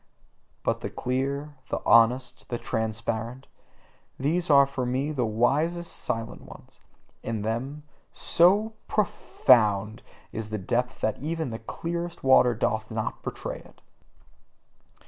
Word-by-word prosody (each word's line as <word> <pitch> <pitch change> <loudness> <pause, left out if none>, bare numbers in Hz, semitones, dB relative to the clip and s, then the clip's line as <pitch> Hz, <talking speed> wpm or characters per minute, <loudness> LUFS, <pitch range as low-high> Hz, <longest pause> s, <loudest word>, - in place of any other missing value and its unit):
But - - 0
the - - -3
clear, 140 +3 -2
the - - -1
honest, 125 +2 +3
the 120 - -2
transparent 115 +3 -3 0.7
these 165 +6 0
are 140 -1 +7
for 135 -1 -4
me 130 +4 -1
the 125 -6 0
wisest 150 +10 0
silent 115 -1 -4
ones: - - -14 0.4
in 110 -3 -3
them, 130 +7 -3 0.3
so 205 +6 +3
PROFOUND 110 - +2 0.3
is 110 -1 -4
the 110 - -2
depth 120 +6 -1
that 110 - 0
even 160 -2 -3
the 115 - -5
clearest 170 +8 -5
water 125 -2 +5
doth 110 0 -1
not 110 -1 -3
betray - - -5
it. - - -18
125 Hz, 125 wpm, -27 LUFS, 115-150 Hz, 0.7 s, are